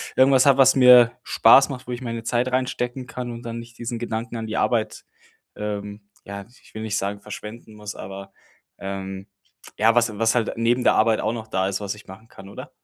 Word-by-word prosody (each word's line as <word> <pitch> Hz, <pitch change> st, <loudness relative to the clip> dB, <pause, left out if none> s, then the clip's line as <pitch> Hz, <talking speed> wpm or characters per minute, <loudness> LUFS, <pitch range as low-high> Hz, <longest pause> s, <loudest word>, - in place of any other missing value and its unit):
irgendwas 130 Hz, 0 st, +5 dB
habe, 140 Hz, -1 st, +4 dB
was 130 Hz, -1 st, +6 dB
mir 125 Hz, -2 st, +7 dB
Spaß 135 Hz, +6 st, +5 dB
macht, 125 Hz, -3 st, -8 dB
wo -, -, -5 dB
ich 120 Hz, +1 st, -5 dB
meine 115 Hz, -2 st, -5 dB
Zeit 120 Hz, +2 st, -1 dB
reinstecken 125 Hz, 0 st, -2 dB
kann 125 Hz, -1 st, -6 dB
und 115 Hz, 0 st, -8 dB
dann 115 Hz, 0 st, -6 dB
nicht 115 Hz, 0 st, -13 dB
diesen 120 Hz, 0 st, -4 dB
Gedanken 115 Hz, 0 st, -4 dB
an 110 Hz, -, -5 dB
die 110 Hz, -, -4 dB
Arbeit, 115 Hz, -3 st, -1 dB, 0.5 s
ähm, 105 Hz, 0 st, -6 dB, 0.2 s
ja, 100 Hz, 0 st, -8 dB, 0.2 s
ich -, -, -22 dB
will 110 Hz, -, -5 dB
nicht 110 Hz, -1 st, -2 dB
sagen, 100 Hz, +1 st, -3 dB
verschwenden 105 Hz, +1 st, -10 dB
muss, 105 Hz, -1 st, -8 dB
aber, 95 Hz, +1 st, -9 dB, 0.5 s
ähm, 95 Hz, 0 st, -6 dB, 0.5 s
ja, 110 Hz, +2 st, +3 dB
was 115 Hz, -3 st, +1 dB
was 115 Hz, +1 st, +2 dB
halt 115 Hz, -2 st, 0 dB
neben 120 Hz, +2 st, +1 dB
der -, -, +4 dB
Arbeit 110 Hz, 0 st, +3 dB
auch -, -, -1 dB
noch 110 Hz, -2 st, -7 dB
da 95 Hz, -3 st, -1 dB
ist, 100 Hz, +1 st, -3 dB
was 100 Hz, 0 st, -4 dB
ich 105 Hz, -, -15 dB
machen 95 Hz, +4 st, -13 dB
kann, 95 Hz, -3 st, -14 dB
oder? -, -, -10 dB
115 Hz, 215 wpm, -23 LUFS, 105-120 Hz, 0.5 s, mir